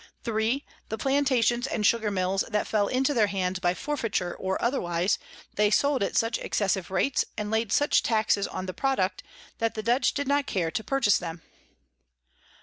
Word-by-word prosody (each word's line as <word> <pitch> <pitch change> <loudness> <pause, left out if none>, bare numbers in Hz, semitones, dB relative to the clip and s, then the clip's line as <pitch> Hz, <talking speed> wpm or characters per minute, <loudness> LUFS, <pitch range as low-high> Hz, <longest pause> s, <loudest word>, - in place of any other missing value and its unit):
3. 230 +4 0 0.2
The 220 - -3
Plantations 260 -1 +2
and 210 -5 -1
Sugar 220 0 +3
Mills 190 0 0
that 210 -2 0
fell 205 -2 +1
into 265 +5 +1
their 220 -5 +3
hands 185 -2 -2
by 180 -1 +1
Forfeiture 230 -11 -2
or 190 0 -2
otherwise, 180 -7 0 0.3
they 210 0 +3
sold 280 +5 +2
at 200 - 0
such 230 +1 +1
excessive 190 -3 -1
Rates, 195 +8 +1
and 210 0 -3
laid 220 -1 0
such 290 +5 +3
Taxes 215 -3 +1
on 185 - -5
the 185 - -5
Product, 195 -9 0 0.4
that 225 0 0
the 215 - -4
Dutch 245 +3 +2
did 285 -1 -2
not 285 0 +1
care 170 -4 -1
to 220 - -3
purchase 270 -6 +2
them. 165 -2 -7
220 Hz, 175 wpm, -27 LUFS, 190-255 Hz, 0.4 s, Sugar